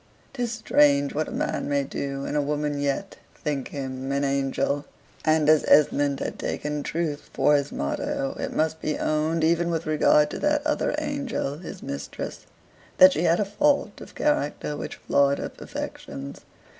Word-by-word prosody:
'Tis 245 -3 -2
strange 145 -10 +3
what 155 +1 -1
a - - -7
man - - -2
may 140 -1 +1
do, 140 0 -4
and - - -3
a 150 - +3
woman 145 0 -1
yet 145 +8 -2 0.2
think 140 -3 -3
him 135 -1 -5
an 140 +1 0
angel. 140 +1 0 0.4
And 155 -1 +3
as 155 -1 +5
Esmond 145 -1 +4
has - - -2
taken 150 0 -3
truth 155 -1 -3
for 150 - +4
his 140 0 0
motto, 135 - -2
it - - -3
must 160 0 0
be 155 - -1
owned, 155 +1 0
even 170 +1 +2
with 165 -1 -1
regard 150 -1 +4
to - - -5
that 295 0 +1
other 300 -1 0
angel, 280 - -2
his 175 - -9
mistress, 70 +1 -6 0.5
that 185 0 +9
she 160 +4 0
had 170 +1 +3
a 210 - +2
fault 285 +8 +1
of - - -11
character 150 - 0
which - - -6
flawed 140 0 +2
her - - -4
perfections. 70 0 -7
150 Hz, 170 wpm, -25 LUFS, 140-170 Hz, 0.5 s, that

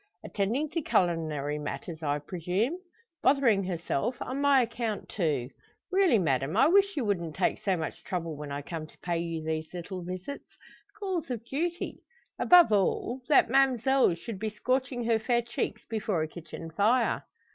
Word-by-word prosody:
"Attending 225 +10 -1
to 330 - -1
culinary 155 - 0
matters, 150 +3 -5
I 145 -2 0
presume? 180 - -2 0.4
Bothering 235 -9 +4
herself 175 - -2
on 270 +1 -3
my 280 -2 +5
account, 230 -3 -3
too! 145 - -1 0.4
Really, 375 - +4
madame, 145 -1 0
I 270 - +6
wish 395 0 +4
you 260 - 0
wouldn't 170 -6 -1
take - - 0
so 190 -3 +1
much 160 - -5
trouble 165 -4 -3
when 145 -1 -7
I 140 0 -4
come 160 0 -6
to - - -21
pay 170 -1 0
you 165 -1 -3
these 160 0 -3
little 180 +1 -5
visits 185 +10 -7 0.4
calls 375 -8 -2
of 235 -2 -4
duty. 340 +7 -3 0.4
Above 350 -7 +7
all, 215 +5 +1
that 275 -5 +5
ma'mselle 265 -5 +4
should 195 +4 -7
be 220 +1 -1
scorching 250 +3 -1
her 230 -1 +2
fair 240 +1 +1
cheeks 235 +1 -3
before 210 -7 -1
a - - -2
kitchen 165 0 -9
fire." 225 +8 +2
205 Hz, 165 wpm, -29 LUFS, 165-255 Hz, 0.4 s, Above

